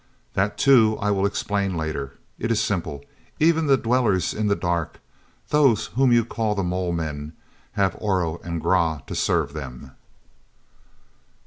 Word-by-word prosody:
"That, 100 +2 0
too, 115 -6 +5
I 105 0 0
will 100 0 +2
explain 100 -2 -2
later. 75 -4 -4 0.3
It 115 - -2
is 115 -2 +2
simple; 80 -7 -2 0.3
even 160 0 +3
the 135 -1 +5
Dwellers 115 -7 +1
in 105 -1 -1
the 100 - +2
Dark—those 100 - -1
whom 130 0 +3
you 120 -2 +4
call 110 -3 -1
the 100 - -1
mole 90 0 -1
men—have 80 +5 -4
Oro 90 -5 -1
and 85 -1 -3
Grah 80 -4 +1
to - - -7
serve 70 - 0
them." 65 -5 -8
95 Hz, 140 wpm, -23 LUFS, 80-110 Hz, 0.3 s, too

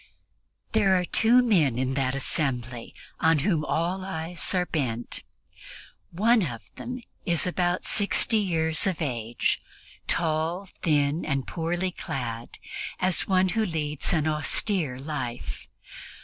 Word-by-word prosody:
There 200 -4 +4
are 180 - -1
two 240 +7 +4
men 165 - +3
in 130 +1 0
that 135 -1 0
assembly 125 -4 -2 0.2
on 160 0 +4
whom 170 -7 +2
all 175 +5 -1
eyes 175 0 -2
are 180 -1 +2
bent. 120 -9 -2 0.9
One 220 +6 +3
of 120 - -3
them 250 0 -6 0.2
is 170 -4 +2
about 180 0 0
sixty 215 +2 +3
years 160 -4 +1
of 185 -4 -1
age, 120 -6 -1 0.5
tall, 165 +3 0
thin 150 0 +2
and 140 -3 -1
poorly 175 +2 -2
clad, 120 -8 -5 0.4
as 185 -1 +1
one 185 -1 +3
who 220 +3 +1
leads 155 -6 -1
an 160 -3 +2
austere 155 - +1
life. 130 -4 -5
160 Hz, 125 wpm, -26 LUFS, 140-185 Hz, 0.9 s, There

